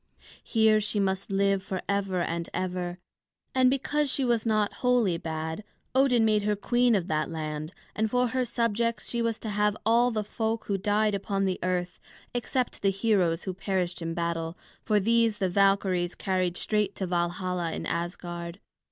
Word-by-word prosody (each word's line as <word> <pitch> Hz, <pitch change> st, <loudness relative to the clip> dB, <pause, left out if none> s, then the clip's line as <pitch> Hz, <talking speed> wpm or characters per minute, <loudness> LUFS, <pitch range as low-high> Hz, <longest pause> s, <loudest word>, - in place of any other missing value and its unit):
Here 220 Hz, -2 st, +3 dB
she 210 Hz, 0 st, 0 dB
must 195 Hz, 0 st, -1 dB
live 195 Hz, 0 st, +2 dB
forever 190 Hz, 0 st, -2 dB
and 170 Hz, 0 st, -2 dB
ever. 180 Hz, -1 st, -2 dB, 0.6 s
And, 260 Hz, -1 st, +5 dB
because 275 Hz, +2 st, 0 dB
she 270 Hz, -, 0 dB
was 235 Hz, -2 st, +1 dB
not 215 Hz, -2 st, +2 dB
wholly 240 Hz, -9 st, +3 dB
bad, 160 Hz, +4 st, -4 dB, 0.3 s
Odin 260 Hz, -3 st, +4 dB
made 215 Hz, -1 st, +3 dB
her 210 Hz, 0 st, +1 dB
queen 240 Hz, +3 st, +2 dB
of 185 Hz, -4 st, 0 dB
that 155 Hz, -3 st, 0 dB
land, 155 Hz, -1 st, -4 dB, 0.2 s
and 220 Hz, 0 st, +1 dB
for 250 Hz, +1 st, +2 dB
her 255 Hz, +1 st, 0 dB
subjects 230 Hz, -1 st, 0 dB
she 235 Hz, -, -1 dB
was 230 Hz, -1 st, 0 dB
to 220 Hz, -, -6 dB
have 210 Hz, 0 st, +1 dB
all 235 Hz, +2 st, +4 dB
the 215 Hz, -3 st, -1 dB
folk 220 Hz, +2 st, -2 dB
who 200 Hz, -1 st, -1 dB
died 210 Hz, +1 st, +2 dB
upon 195 Hz, 0 st, -1 dB
the 185 Hz, -1 st, -1 dB
earth, 180 Hz, 0 st, -2 dB, 0.3 s
except 245 Hz, +1 st, -2 dB
the 195 Hz, -, +3 dB
heroes 195 Hz, -4 st, +1 dB
who 190 Hz, -, -3 dB
perished 185 Hz, -2 st, -2 dB
in 165 Hz, 0 st, -3 dB
battle; 170 Hz, 0 st, -2 dB, 0.2 s
for 210 Hz, -1 st, +2 dB
these 230 Hz, +1 st, +3 dB
the 190 Hz, -3 st, 0 dB
Valkyries 190 Hz, -2 st, +2 dB
carried 185 Hz, -2 st, -1 dB
straight 210 Hz, -2 st, 0 dB
to 190 Hz, -, -2 dB
Valhalla 175 Hz, 0 st, -1 dB
in -, -, -4 dB
Asgard. 170 Hz, +1 st, -4 dB
200 Hz, 170 wpm, -28 LUFS, 180-225 Hz, 0.6 s, And